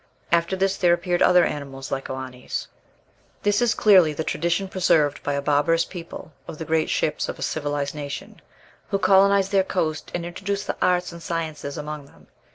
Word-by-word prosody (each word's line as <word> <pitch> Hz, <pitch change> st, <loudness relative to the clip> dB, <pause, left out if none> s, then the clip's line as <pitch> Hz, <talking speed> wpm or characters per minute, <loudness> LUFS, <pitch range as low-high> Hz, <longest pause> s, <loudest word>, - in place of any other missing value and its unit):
After 170 Hz, +2 st, +2 dB
this 195 Hz, +1 st, 0 dB
there 175 Hz, -2 st, +4 dB
appeared 175 Hz, 0 st, -1 dB
other 180 Hz, -1 st, +6 dB
animals 135 Hz, -2 st, -5 dB
like 135 Hz, -, -3 dB
Oannes." 130 Hz, -1 st, -5 dB, 0.8 s
This 205 Hz, +2 st, +2 dB
is 240 Hz, -2 st, +2 dB
clearly 185 Hz, -7 st, +5 dB
the 160 Hz, -, -3 dB
tradition 170 Hz, +4 st, -1 dB
preserved 160 Hz, -6 st, +2 dB
by 145 Hz, -, -2 dB
a 140 Hz, 0 st, -2 dB
barbarous 150 Hz, +3 st, +2 dB
people 170 Hz, -3 st, -9 dB, 0.2 s
of -, -, -7 dB
the 160 Hz, -, -5 dB
great 160 Hz, 0 st, +1 dB
ships 155 Hz, -, 0 dB
of -, -, -5 dB
a -, -, -5 dB
civilized 145 Hz, -2 st, -2 dB
nation, 145 Hz, -3 st, -7 dB, 0.5 s
who 195 Hz, -, +1 dB
colonized 195 Hz, +1 st, +4 dB
their 195 Hz, -1 st, +4 dB
coast 160 Hz, -5 st, -2 dB
and 175 Hz, -1 st, -3 dB
introduced 195 Hz, +3 st, -3 dB
the -, -, -3 dB
arts 180 Hz, 0 st, +2 dB
and 170 Hz, 0 st, -10 dB
sciences 160 Hz, -3 st, -4 dB
among 150 Hz, -1 st, -6 dB
them. -, -, -21 dB
165 Hz, 180 wpm, -24 LUFS, 145-185 Hz, 0.8 s, other